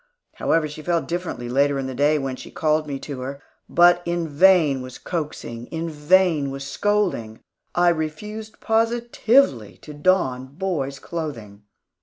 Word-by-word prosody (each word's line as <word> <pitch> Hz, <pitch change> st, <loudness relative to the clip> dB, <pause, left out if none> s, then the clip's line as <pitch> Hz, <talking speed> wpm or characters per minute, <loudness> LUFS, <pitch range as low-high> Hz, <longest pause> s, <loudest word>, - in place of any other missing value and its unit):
However, 165 Hz, -2 st, +1 dB
she 150 Hz, +1 st, -9 dB
felt 170 Hz, 0 st, 0 dB
differently 170 Hz, -8 st, -4 dB
later 140 Hz, +3 st, +2 dB
in 135 Hz, -, -2 dB
the 130 Hz, -, -4 dB
day 145 Hz, +4 st, +3 dB
when 135 Hz, -2 st, -3 dB
she -, -, -10 dB
called 155 Hz, -1 st, 0 dB
me 140 Hz, -2 st, -3 dB
to 140 Hz, -3 st, -6 dB
her. 135 Hz, +2 st, -5 dB, 0.3 s
But 175 Hz, +1 st, +5 dB
in 170 Hz, -1 st, -2 dB
vain 155 Hz, -3 st, +4 dB
was 130 Hz, 0 st, -8 dB
coaxing, 145 Hz, -8 st, -5 dB
in 165 Hz, 0 st, -4 dB
vain 155 Hz, -1 st, +3 dB
was 135 Hz, 0 st, -6 dB
scolding, 180 Hz, -, -1 dB, 0.3 s
I 175 Hz, 0 st, +5 dB
refused 210 Hz, +7 st, -4 dB
positively 230 Hz, -, +2 dB
to 150 Hz, -, -9 dB
don 145 Hz, -5 st, +1 dB
boy's 155 Hz, -7 st, -2 dB
clothing. 115 Hz, -12 st, -6 dB
155 Hz, 150 wpm, -23 LUFS, 135-175 Hz, 0.3 s, But